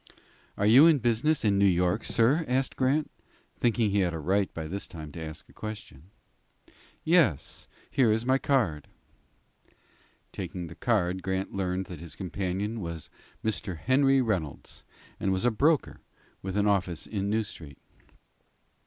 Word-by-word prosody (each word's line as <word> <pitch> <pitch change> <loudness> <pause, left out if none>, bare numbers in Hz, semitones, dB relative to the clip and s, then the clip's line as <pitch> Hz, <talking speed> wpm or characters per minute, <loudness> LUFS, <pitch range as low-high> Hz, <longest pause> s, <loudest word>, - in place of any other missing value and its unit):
"Are 100 - +1
you 130 +9 +8
in 160 -3 +5
business 120 +4 +1
in 100 -2 +3
New 100 - +5
York, 90 +3 +1
sir?" 130 +9 +3
asked 130 +1 0
Grant, 140 +4 +1 0.4
thinking 115 -3 +1
he 100 - +2
had 90 -3 +1
a - - -4
right 95 +5 +1
by 80 - -6
this 95 +6 -5
time 80 -3 -9
to 80 - -8
ask 80 0 -7
a - - -20
question. 105 -8 -8 0.9
"Yes; 155 - +2 0.2
here 125 -6 +3
is 110 +2 0
my 130 +1 +3
card." 105 - 0 1.4
Taking 90 -1 -5
the 85 0 -10
card, 95 -5 0
Grant 95 0 -3
learned 95 -1 -2
that 90 -4 -9
his 85 -2 -10
companion 95 +4 -3
was 85 -3 -6 0.3
Mr. 95 -4 -1
Henry 135 - +3
Reynolds 90 - -3 0.4
and 95 - 0
was 95 +4 0
a 120 - +4
broker, 145 +7 +1 0.4
with 95 +1 -4
an 105 - +2
office 95 -5 0
in 100 -2 -3
New 110 +1 +1
Street. 75 -8 -10
100 Hz, 155 wpm, -28 LUFS, 90-120 Hz, 1.4 s, you